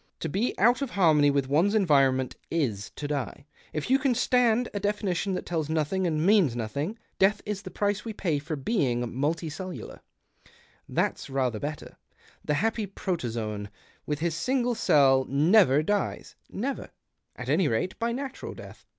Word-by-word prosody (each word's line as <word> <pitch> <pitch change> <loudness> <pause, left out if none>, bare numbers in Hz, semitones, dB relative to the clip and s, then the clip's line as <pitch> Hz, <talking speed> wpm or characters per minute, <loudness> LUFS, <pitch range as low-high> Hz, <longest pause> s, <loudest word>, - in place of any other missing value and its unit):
To - - -1
be 205 - -1
out 240 +7 +4
of 275 - -1
harmony 155 -8 +4
with 140 -2 +1
one's 170 +10 +2
environment 135 -9 +3
is 115 -11 -1
to 145 - -4
die, 140 -2 -4 0.3
if 155 - -3
you 265 +2 +4
can 260 -2 +1
stand 245 -1 +3
a 205 - -2
definition 200 -2 -1
that - - -4
tells 160 -3 -2
nothing 160 +4 0
and 155 -1 0
means 190 - +4
nothing. 140 - -3 0.2
Death 200 +2 +4
is 205 -1 -3
the - - -8
price 205 0 -1
we 230 - -4
pay 170 -8 -1
for 155 +2 -5
l)eing 135 - 0
multicellular. 160 +6 -3 0.9
That's - - -1
rather 130 -5 0
Ijetter. 150 +4 -6 0.5
The 150 - 0
happy 220 +4 0
protozoan, 115 - -3 0.4
with 150 0 -2
his 170 -1 0
single 245 +8 0
cell, 135 - +4
never 155 0 +5
dies 205 +4 -2
— - - -44
never, 265 +7 -4 0.5
at - - -7
any 185 - +3
rate, 130 +10 -1
by 230 +1 0
natural 265 +2 -5
death. - - -12
165 Hz, 165 wpm, -27 LUFS, 140-210 Hz, 0.9 s, never